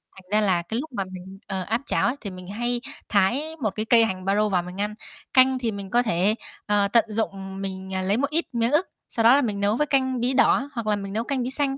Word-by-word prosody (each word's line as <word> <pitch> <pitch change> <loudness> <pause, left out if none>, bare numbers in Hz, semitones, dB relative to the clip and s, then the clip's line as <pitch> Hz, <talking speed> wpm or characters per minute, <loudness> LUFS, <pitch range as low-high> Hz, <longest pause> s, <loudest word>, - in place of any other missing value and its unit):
thành 190 - -14
ra 215 0 +4
là 175 -2 +2
cái 220 +8 -3
lúc 315 - -5
mà 195 - +1
mình, 190 +1 -10
ờ, 190 -1 -2
áp 225 +6 -1
chảo - - +1
ấy 250 - 0
thì 200 - -5
mình 185 0 -10
hay 240 +4 -1 0.3
thái 205 +8 +2 0.2
một 215 -4 -1
cái 215 0 -2
cây 230 -1 +6
hành 185 -3 -4
baro 210 +2 +2
vào 180 -3 +1
mình 180 +3 -6
ăn. 210 +1 -1 0.4
Canh 260 0 +5
thì 230 -3 -1
mình 200 -1 -7
có 240 +3 +3
thể, 205 0 +2 0.3
ờ, 205 -1 +3
tận 230 +1 +4
dụng 195 -3 -3
mình, 190 -1 -5
ờ, 190 - 0
lấy 195 +4 +1
một 280 +2 0
ít 330 +3 +1
miếng 235 +1 +1
ức, 305 +5 +3 0.2
sau 230 - -1
đó 235 +4 +7
là 285 - +4
mình 210 -6 -2
nấu 200 +2 +2
với 300 - +1
canh 260 -3 +1
bí 250 +2 +1
đỏ 270 +1 +3
hoặc 230 -3 -4
là 210 - +3
mình 195 -1 -6
nấu 225 - 0
canh 265 0 -2
bí 250 - -2
xanh, 270 0 -1
215 Hz, 275 wpm, -24 LUFS, 195-245 Hz, 0.4 s, đó